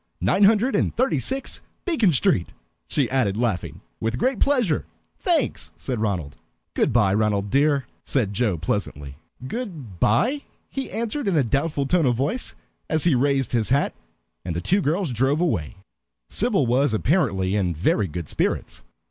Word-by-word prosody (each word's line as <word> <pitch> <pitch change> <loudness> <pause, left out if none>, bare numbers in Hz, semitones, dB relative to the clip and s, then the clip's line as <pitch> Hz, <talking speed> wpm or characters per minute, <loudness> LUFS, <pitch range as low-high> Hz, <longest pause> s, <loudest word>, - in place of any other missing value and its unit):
Nine 200 +1 +3
hundred 225 +5 +3
and - - +1
thirty 260 +3 +1
six, 270 +1 -1 0.2
Beacon 285 - +3
Street," 150 - +1 0.3
she 140 -4 +1
added, 120 -7 +1
laughing. 110 -7 -2 0.2
"With 115 +2 -1
great 255 - 0
pleasure 245 - +1 0.3
thanks," 335 -7 0
said 125 -4 -3
Ronald. 90 -10 -2 0.4
"Good - - +1
by, 105 -5 +3
Ronald 105 -1 +1
dear," 140 0 +3 0.2
said 110 -7 0
Joe 105 -5 0
pleasantly. 75 -5 -3 0.3
"Good 150 - -6
by," 240 - +2 0.3
he 270 -1 -4
answered 230 +3 -3
in 185 -5 +2
a 145 - +4
doubtful 140 +4 0
tone 165 0 +2
of 120 - +2
voice, 145 - -1 0.3
as 160 -1 +1
he 170 - +4
raised 135 +1 +1
his 115 -3 +1
hat; 140 +3 +2 0.5
and 85 -2 -4
the - - -1
two 190 - +1
girls 165 0 0
drove 135 +5 +1
away. 100 - -1 0.5
Sybil 205 - +2
was 125 0 +2
apparently 105 - +1
in 90 -5 0
very 95 +5 +1
good 85 -1 -6
spirits. - - -2
135 Hz, 160 wpm, -23 LUFS, -, 0.5 s, a